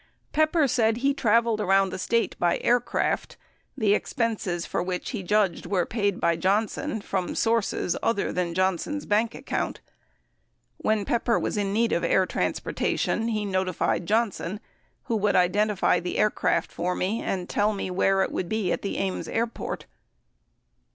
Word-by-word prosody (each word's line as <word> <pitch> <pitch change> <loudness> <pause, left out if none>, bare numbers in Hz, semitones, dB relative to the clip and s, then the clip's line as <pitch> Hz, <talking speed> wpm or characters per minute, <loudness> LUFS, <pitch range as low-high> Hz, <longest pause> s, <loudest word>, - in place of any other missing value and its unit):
Pepper 310 0 +3
said 225 -2 +2
he 275 +3 +2
traveled 230 -3 +2
around 195 -1 +3
the - - -5
State 230 +4 0
by 175 - +2
aircraft, 245 0 0 0.4
the 215 -5 +3
expenses 210 -6 -1
for - - -2
which 180 0 -3
he 225 -6 -3
judged 190 -2 +1
were 180 -2 +1
paid 205 -4 -1
by 170 - +2
Johnson 215 - 0
from 190 -2 -2
sources 225 -5 +1
other 230 -3 0
than 175 -2 -1
Johnson's 190 - 0
bank 220 +2 +1
account. - - -3 1.0
When 215 -2 0
Pepper 235 0 +1
was - - -2
in 200 -2 0
need 225 +3 +1
of 170 - 0
air 190 - +3
transporta - - -1
tion, 225 - 0
he 215 -2 -1
notified 185 -3 -1
Johnson 210 -3 0 0.4
who 235 - -2
"... - - +2
would 205 0 +1
identify 195 +1 +3
the 175 +1 -4
aircraft 210 0 +1
for 180 +1 -2
me 205 +5 -1
and 180 -2 -2
tell 210 +1 +1
me 195 -3 -4
where 195 +1 +2
it - - -3
would 175 - -3
be 220 -5 0
at - - -1
the 200 - -3
Ames 195 -1 -2
airport. 230 0 -3
205 Hz, 165 wpm, -26 LUFS, 185-225 Hz, 1.0 s, Pepper